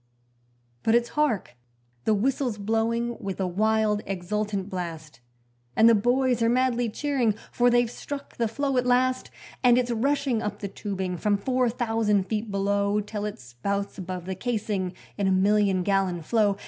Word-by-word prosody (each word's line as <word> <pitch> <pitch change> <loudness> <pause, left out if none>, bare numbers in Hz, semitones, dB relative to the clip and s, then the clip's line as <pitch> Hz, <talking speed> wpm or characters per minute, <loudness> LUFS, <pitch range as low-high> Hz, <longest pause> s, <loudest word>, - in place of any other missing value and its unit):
But 225 - +3
it's 235 0 +2
hark! 280 - 0 0.5
the 215 - +3
whistle's 245 +1 0
blowing 230 +3 0
with 195 -1 -5
a 190 - +1
wild, 210 +3 +1
exultant 195 +1 -2
blast, 165 -6 -6 0.6
And 225 - +6
the 230 - +7
boys 245 +3 +2
are 230 - +3
madly 245 -1 +2
cheering, 250 -3 0 0.2
for 245 0 +3
they've 240 0 +3
struck 280 +2 -7
the 230 - +1
flow 275 +4 -1
at 250 0 +1
last, 255 +1 +2 0.3
And 245 -1 +6
it's 250 -1 +1
rushing 270 0 +1
up 210 -2 -3
the 205 - -5
tubing 190 -3 -4
from 205 +4 +1
four 250 +3 +1
thousand 225 -4 +1
feet 215 +3 -3
below 200 +1 +1
Till 210 0 -4
it 210 - -4
spouts 195 +14 -4
above 180 -1 -5
the 190 - -3
casing 200 -3 -2 0.3
in 200 - +2
a - - +3
million 195 0 +3
gallon 190 -3 0
flow. 205 +1 +2
215 Hz, 165 wpm, -26 LUFS, 195-240 Hz, 0.6 s, the